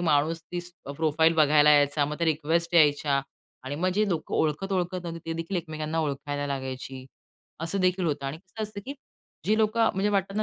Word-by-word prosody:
माणूस 160 0 +2
तीच 175 0 -5 0.2
प्रोफाईल 160 +1 +3
बघायला 150 -1 +5
यायचा, 145 0 +4
मग 150 +1 -4
त्या 170 - +1
रिक्वेस्ट 165 +2 0
यायच्या 145 -3 +4 0.4
आणि 135 +2 -4
मग 180 +4 +1
जे 210 +1 +2
लोकं 165 -5 -2
ओळखत-ओळखत 180 +3 0
न्हवती 170 -1 -5
ती - - 0
देखील 165 +3 -3
एकमेकांना 155 -1 -3
ओळखायला 145 -1 -3
लागायची. 130 -1 -5 0.6
असं 170 +4 0
देखील 185 0 +2
होतं 145 -2 -2
आणि 135 +3 -4
कसं 190 +5 -8
असतं, 210 -1 -5
की 275 - -5 0.5
जी 215 +1 +3
लोकं, 225 +1 +3
म्हणजे 195 +2 +1
वाटतं 195 0 0
ना 215 - +2
160 Hz, 185 wpm, -27 LUFS, 145-185 Hz, 0.6 s, बघायला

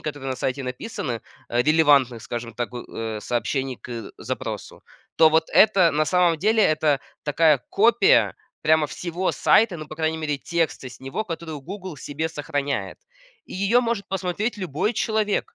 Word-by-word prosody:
которые 145 -3 -5
на 130 - -3
сайте 130 +1 -2
написаны, 125 - -5 0.3
а, 120 +1 +1
релевантных, 140 -6 +4
скажем 115 -1 -6
так, 120 +2 -4
у, 120 - -6
э, 110 -1 -5
сообщений 130 +3 -2
к 115 -4 -8
запросу. - - -6 0.3
То 160 - +7
вот 160 +1 +2
это, 195 -5 +6
на 155 +1 +1
самом 170 +1 +2
деле, 215 +4 +3
это 155 -2 +2 0.2
такая 150 0 +4
копия 230 +3 +4 0.3
прямо 155 -1 +4
всего 175 +4 -2
сайта, 215 -5 +3
ну, 155 -2 -8
по 155 - -8
крайней 160 0 0
мере, 150 -2 -2
текста 165 -3 -2
с 125 - -14
него, 135 +11 -4
который 165 -4 -6
"Гугл" 185 +3 -7
в - - -13
себе 155 +3 -3
сохраняет. 145 -2 -3 0.5
И - - -13
ее 200 +6 +3
может 230 -5 -2
посмотреть 195 +4 -2
любой 185 - -1
человек. 220 - -1
155 Hz, 165 wpm, -23 LUFS, 135-185 Hz, 0.5 s, То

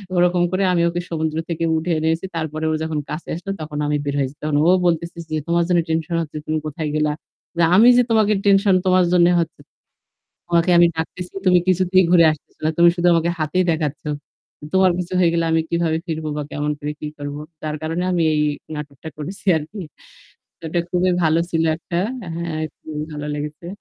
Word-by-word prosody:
ওরকম 175 0 +3
করে 185 +1 0
আমি 170 - +2
ওকে 175 +1 -3
সমুদ্র 160 -1 -2
থেকে 165 -1 -2
উঠে 165 +2 -2
এনেছি। 160 +3 0
তারপরে 155 -1 -3
ও - - 0
যখন 160 -1 -2
কাছে 155 +2 -6
আসলো 180 +4 -5
তখন 150 -1 -6
আমি 150 0 +1
বের 140 0 -2
হয়েছি। 135 0 -2
তখন 150 -1 -1
ও - - +6 0.2
বলতেছে 170 0 -1
যে, 155 - -2
"তোমার 170 0 +2
জন্য 175 -1 +4
টেনশন 160 +1 -1
হচ্ছে 155 -2 -6
তুমি 155 - 0
কোথায় 155 +1 -4
গেলা? 150 0 +1 0.6
আমি 220 +5 +7
যে 250 - +6
তোমাকে 215 -2 +4
টেনশন, 200 -1 +4
তোমার 185 -1 +4
জন্যে 175 0 +5
হচ্ছে। 165 -3 -3 0.9
তোমাকে 170 +1 +2
আমি 175 - +7
ডাকতেছি 175 +2 -5
তুমি 180 -1 +6
কিছুতেই 185 0 +3
ঘুরে 170 -2 +7
আসতেছ 155 - -10
না। 155 - +2
তুমি 170 0 +7
শুধু 175 0 +1
আমাকে 165 0 +2
হাতেই 155 +4 +1
দেখাচ্ছ। 155 -2 -2 0.7
তোমার 190 -1 +5
কিছু 180 0 -4
হয়ে 175 -2 +4
গেলে 170 0 +1
আমি 160 0 +3
কিভাবে 170 -1 0
ফিরবো 160 -1 -3
বা - - -1
কেমন 150 0 -1
করে 150 +1 -3
কি 150 - -5
করব? 145 0 -5 0.3
যার 155 -1 -3
কারণে 165 +3 -2
আমি 175 -2 +1
এই 150 - +1 0.3
নাটকটা 145 0 -8
করেছি 165 +8 -7
আরকি।" 170 +7 -7 0.9
এটা 175 +2 -1
খুবই 180 0 +1
ভালো 160 0 +3
ছিল 165 -1 +1
একটা 170 0 -5 0.4
হ্যাঁ, 170 -2 -3 0.2
খুবই 150 -1 -7
ভালো 150 0 -5
লেগেছে। 150 +3 -6
165 Hz, 190 wpm, -21 LUFS, 155-175 Hz, 0.9 s, আমি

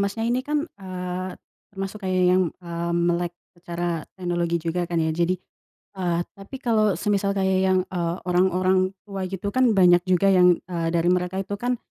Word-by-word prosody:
Masnya, 200 +3 -1
ini 240 +2 +1
kan, 295 +2 -1 0.2
eee, 185 0 -4 0.4
termasuk 195 +1 -5
kayak 185 -1 +1
yang, 185 +1 +4 0.2
eee, 170 0 -3
melek 175 0 +1 0.2
secara 175 -2 -4
teknologi 175 -2 -1
juga 170 +1 -1
kan 175 - -2
ya. 160 -1 +1
Jadi, 170 +3 +1 0.6
eee, 175 -2 0 0.2
tapi 195 +7 -9
kalau 215 -6 +2
semisal 200 -1 0
kayak 190 -1 +2
yang, 185 0 +4
eee, 170 -2 -2
orang-orang 185 +1 +2
tua 195 -2 -4
gitu 190 +1 -4
kan 255 -1 +4
banyak 175 -2 +6
juga 185 +2 +3
yang, 180 -2 +6
eee, 170 -2 -2
dari 170 0 +2
mereka 180 +1 -1
itu 195 - -6
kan, 245 +1 0
185 Hz, 170 wpm, -24 LUFS, 175-195 Hz, 0.6 s, banyak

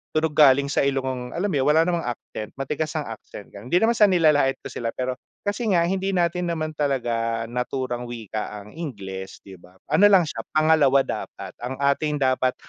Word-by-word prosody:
tunog 155 0 +2
galing 140 -1 +5
sa - - +1
ilong, 130 -2 -2
alam 190 +5 -1
mo 145 - +1
wala 155 +2 +5
namang 170 -1 -1
accent 110 -2 -6
matigas 150 +4 -3
ang 155 - -1
accent, 110 -4 -10
hindi 110 +10 -4
naman 225 - +4
sa 220 -3 +5
nilalait 155 -7 +3
ko - - -7
sila 115 - -4
pero 130 0 -3 0.2
kasi 205 +3 -2
nga 180 -5 +3
hindi 190 +2 -1
natin 175 0 0
naman 160 -2 -2
talaga 120 -6 -1
naturang 125 0 -3
wika 110 -3 -6
ang 105 - -14
Ingles, 95 - -7
'di 95 -2 -12
ba? 90 +1 -19 0.2
Ano 205 - +6
lang 195 -3 +6
siya 155 - -6 0.2
pangalawa 155 -3 +4
dapat, - - -6
ang 125 +2 -4
ating 150 +2 +1
dapat 130 -2 +1
140 Hz, 185 wpm, -24 LUFS, 120-165 Hz, 0.2 s, Ano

